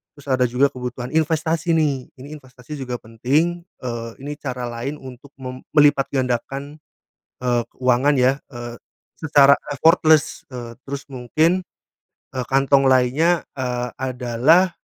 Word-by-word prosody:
Terus 145 Hz, -1 st, -16 dB
ada 130 Hz, -1 st, +3 dB
juga 135 Hz, +3 st, +2 dB
kebutuhan 125 Hz, 0 st, -6 dB
investasi, 160 Hz, +1 st, +1 dB
nih, 145 Hz, -5 st, 0 dB
ini 140 Hz, +3 st, -10 dB
investasi 130 Hz, +2 st, -11 dB
juga 125 Hz, -2 st, -4 dB
penting, 145 Hz, +10 st, 0 dB, 0.2 s
eee, 115 Hz, -2 st, -4 dB
ini 145 Hz, +1 st, -4 dB
cara 125 Hz, -3 st, -4 dB
lain 125 Hz, +5 st, -4 dB
untuk 130 Hz, +2 st, -12 dB
mem 130 Hz, 0 st, -7 dB
melipatgandakan, 140 Hz, 0 st, +1 dB, 0.6 s
eee, 120 Hz, -1 st, +1 dB
keuangan, 130 Hz, +3 st, +2 dB
ya, 130 Hz, +1 st, +5 dB, 0.2 s
eee, 120 Hz, 0 st, -7 dB, 0.4 s
secara 140 Hz, -3 st, +5 dB, 0.2 s
effortless. 160 Hz, 0 st, +3 dB
Eee, 120 Hz, -2 st, -7 dB
terus 140 Hz, 0 st, -5 dB
mungkin, 155 Hz, +9 st, +1 dB, 0.7 s
eee, 125 Hz, -, -2 dB
kantong 135 Hz, 0 st, +3 dB
lainnya, 135 Hz, +7 st, +3 dB
eee, 125 Hz, -1 st, -2 dB
adalah 130 Hz, +8 st, +2 dB
135 Hz, 125 wpm, -21 LUFS, 125-150 Hz, 0.7 s, ya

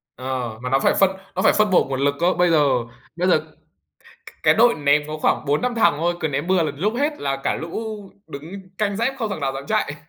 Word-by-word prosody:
Ờ, 125 Hz, -3 st, -4 dB
mà 125 Hz, -, -4 dB
nó 135 Hz, +1 st, +3 dB
phải -, -, +2 dB
phân 195 Hz, -1 st, +4 dB, 0.2 s
nó 185 Hz, -, 0 dB
phải -, -, +4 dB
phân 215 Hz, 0 st, +2 dB
bổ 185 Hz, -, +4 dB
nguồn 135 Hz, -1 st, -4 dB
lực 140 Hz, +1 st, +1 dB
cơ. 175 Hz, +2 st, +2 dB
Bây 180 Hz, 0 st, +2 dB
giờ 155 Hz, -3 st, +4 dB, 0.5 s
bây 180 Hz, +1 st, 0 dB
giờ 185 Hz, -, +4 dB
c -, -, -19 dB, 0.7 s
cái -, -, +5 dB
đội 235 Hz, +1 st, +5 dB
ném 145 Hz, 0 st, +2 dB
có 155 Hz, 0 st, -6 dB
khoảng -, -, +1 dB
4-5 155 Hz, -, 0 dB
thằng 225 Hz, -9 st, +3 dB
thôi, 170 Hz, +3 st, 0 dB
cứ 160 Hz, -, 0 dB
ném 145 Hz, +3 st, -3 dB
bừa 185 Hz, -2 st, +2 dB
là 150 Hz, -, -2 dB
lúc 210 Hz, +8 st, -1 dB
hết 295 Hz, +3 st, -1 dB
là 135 Hz, -1 st, -1 dB
cả 135 Hz, -, -2 dB
lũ 165 Hz, +7 st, -5 dB, 0.5 s
đứng 180 Hz, +7 st, -9 dB
canh 205 Hz, -2 st, 0 dB
dép 235 Hz, +5 st, 0 dB
không 220 Hz, -4 st, -2 dB
thằng 195 Hz, -, -4 dB
nào 135 Hz, -1 st, -1 dB
dám 135 Hz, +1 st, -7 dB
chạy. 145 Hz, -, 0 dB
165 Hz, 250 wpm, -21 LUFS, 140-195 Hz, 0.7 s, cái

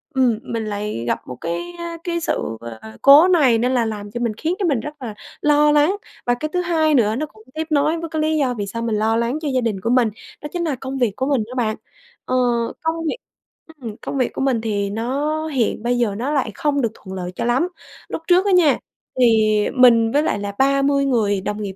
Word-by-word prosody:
ừm, 245 Hz, -4 st, +2 dB
mình 225 Hz, -2 st, -4 dB
lại 205 Hz, -, -4 dB
gặp -, -, 0 dB
một 125 Hz, -, -6 dB
cái, 345 Hz, -, -4 dB
a, 340 Hz, -1 st, -6 dB
cái 340 Hz, -1 st, -2 dB
sự, 115 Hz, -, -2 dB, 0.2 s
à, 110 Hz, 0 st, -11 dB
cố 290 Hz, +5 st, +8 dB
này 290 Hz, -10 st, +4 dB
nên 250 Hz, +3 st, +1 dB
là 240 Hz, -2 st, +2 dB
làm 205 Hz, -2 st, -5 dB
cho 240 Hz, -, -4 dB
mình 235 Hz, -2 st, -1 dB
khiến 330 Hz, +3 st, -1 dB
cho 385 Hz, -, 0 dB
mình 275 Hz, -7 st, +1 dB
rất 295 Hz, +2 st, -8 dB
là 230 Hz, -4 st, -5 dB, 0.3 s
lo 295 Hz, 0 st, +4 dB
lắng. 295 Hz, +6 st, +3 dB, 0.3 s
Và 245 Hz, -, +2 dB
cái 310 Hz, +5 st, -4 dB
thứ 360 Hz, -, +1 dB
hai 320 Hz, -3 st, +2 dB
nữa 220 Hz, -3 st, +3 dB
nó 305 Hz, -, -2 dB
cũng 220 Hz, -7 st, -19 dB
tiếp 315 Hz, +1 st, -3 dB
nối 305 Hz, +2 st, +2 dB
với 330 Hz, -1 st, -5 dB
cái 315 Hz, -1 st, -2 dB
lý 310 Hz, 0 st, +1 dB
do 260 Hz, -4 st, +1 dB
vì 205 Hz, -3 st, -4 dB
sao 230 Hz, +3 st, -5 dB
mình 230 Hz, -2 st, -1 dB
lo 220 Hz, +1 st, +1 dB
lắng 235 Hz, +5 st, 0 dB
cho 310 Hz, -, -3 dB
gia 255 Hz, -, +2 dB
đình 220 Hz, -5 st, -1 dB
của 230 Hz, -, -1 dB
mình, 245 Hz, -2 st, +3 dB, 0.3 s
đó 295 Hz, -, -6 dB
chính 350 Hz, -, -1 dB
là 310 Hz, -5 st, -1 dB
công 265 Hz, +1 st, -6 dB
việc 240 Hz, -6 st, +1 dB
của 260 Hz, -, -1 dB
mình 275 Hz, -6 st, +1 dB
đó 250 Hz, -, -9 dB
bạn, 220 Hz, -4 st, 0 dB, 0.5 s
ờ, 255 Hz, -, -1 dB, 0.5 s
công 320 Hz, 0 st, 0 dB
việc 485 Hz, -, -2 dB, 0.6 s
ừm, 220 Hz, -3 st, -6 dB
công 275 Hz, -, -4 dB
việc 255 Hz, -, 0 dB
của -, -, -4 dB
mình 260 Hz, -4 st, +1 dB
thì 205 Hz, -3 st, -1 dB
nó 280 Hz, +9 st, -2 dB
hiện 250 Hz, -7 st, -1 dB
bây 245 Hz, +1 st, +1 dB
giờ 225 Hz, -5 st, 0 dB
nó 260 Hz, +6 st, -2 dB
lại 265 Hz, -7 st, 0 dB
không 285 Hz, -2 st, 0 dB
được 230 Hz, -, +1 dB
thuận 190 Hz, -1 st, -9 dB
lợi 180 Hz, -1 st, -4 dB
cho -, -, -2 dB
lắm. 255 Hz, +8 st, +2 dB, 0.4 s
Lúc -, -, -4 dB
trước 365 Hz, +2 st, +4 dB
á 400 Hz, -, +2 dB
nha, 325 Hz, -8 st, +5 dB, 0.4 s
thì 215 Hz, -3 st, +4 dB
mình 230 Hz, -3 st, +5 dB
với 295 Hz, +4 st, +2 dB
lại 260 Hz, -, 0 dB
là 200 Hz, 0 st, -4 dB
30 275 Hz, +1 st, +3 dB
người 210 Hz, -7 st, +1 dB
đồng 210 Hz, +2 st, -4 dB
nghiệp 195 Hz, -2 st, -5 dB
255 Hz, 250 wpm, -20 LUFS, 220-300 Hz, 0.6 s, cố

